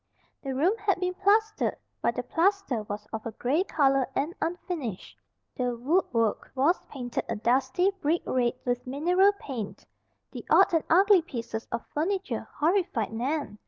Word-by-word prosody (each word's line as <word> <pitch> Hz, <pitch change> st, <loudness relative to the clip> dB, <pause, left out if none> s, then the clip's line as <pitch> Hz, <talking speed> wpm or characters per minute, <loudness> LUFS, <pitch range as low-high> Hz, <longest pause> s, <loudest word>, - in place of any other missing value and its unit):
The 270 Hz, -2 st, -4 dB
room 330 Hz, +9 st, +3 dB
had 405 Hz, -3 st, +1 dB
been 365 Hz, 0 st, -1 dB
plastered, 425 Hz, +3 st, +2 dB, 0.3 s
but -, -, +1 dB
the -, -, -2 dB
plaster 370 Hz, -, +1 dB
was 205 Hz, 0 st, -5 dB
of 220 Hz, -1 st, -4 dB
a 230 Hz, -, -5 dB
gray 280 Hz, -, +1 dB
color 275 Hz, -7 st, +2 dB
and 300 Hz, +5 st, -1 dB
unfinished. 325 Hz, -, -4 dB, 0.4 s
The 245 Hz, -2 st, -1 dB
woodwork 240 Hz, -, 0 dB
was 290 Hz, +7 st, +2 dB
painted 245 Hz, -4 st, -4 dB
a 230 Hz, -, -1 dB
dusty, 260 Hz, -, +2 dB
brick 320 Hz, +4 st, +1 dB
red 245 Hz, -2 st, +1 dB
with 245 Hz, 0 st, -1 dB
mineral 355 Hz, +9 st, +3 dB
paint. 255 Hz, -, -7 dB, 0.5 s
The -, -, -7 dB
odd -, -, +5 dB
and 325 Hz, -, +3 dB
ugly 385 Hz, +2 st, +6 dB
pieces 230 Hz, -6 st, -6 dB
of 235 Hz, -, -3 dB
furniture 375 Hz, +6 st, -2 dB
horrified 320 Hz, -, 0 dB
Nan. 255 Hz, -1 st, -2 dB
285 Hz, 155 wpm, -27 LUFS, 245-365 Hz, 0.5 s, ugly